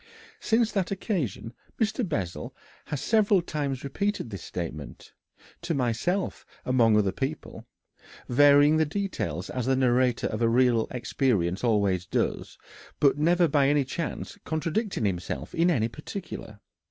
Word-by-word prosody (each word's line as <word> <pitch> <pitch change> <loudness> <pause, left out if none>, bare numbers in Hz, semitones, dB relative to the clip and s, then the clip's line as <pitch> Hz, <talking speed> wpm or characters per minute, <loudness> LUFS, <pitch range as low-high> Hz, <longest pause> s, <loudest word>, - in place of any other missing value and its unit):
Since 225 0 +2
that 190 -3 -1
occasion 165 - -3 0.3
Mr. 225 +2 0
Bessel 95 - -4 0.3
has 145 -3 -4
several 210 +1 +3
times 140 -5 -3
repeated 170 - -2
this 95 -3 -6
statement 80 -5 -7 0.5
to 170 -1 -2
myself 135 - -1 0.2
among 115 -4 +4
other 100 -2 +2
people 135 +10 -5 0.6
varying 145 +3 +6
the 160 - +4
details 155 - -3
as 125 -1 -3
the 135 - +3
narrator 125 -1 +2
of 110 +1 -2
real 115 0 +3
experiences 115 -8 0
always 100 -6 +1
does, - - -2 0.4
but 145 0 +3
never 175 +3 +4
by 140 -2 +3
any 145 -1 +2
chance 150 +4 -5
contradicting 165 - -2
himself 90 -3 -3
in 170 +2 +3
any 115 -10 +2
particular. 115 - -8
135 Hz, 130 wpm, -27 LUFS, 115-170 Hz, 0.6 s, varying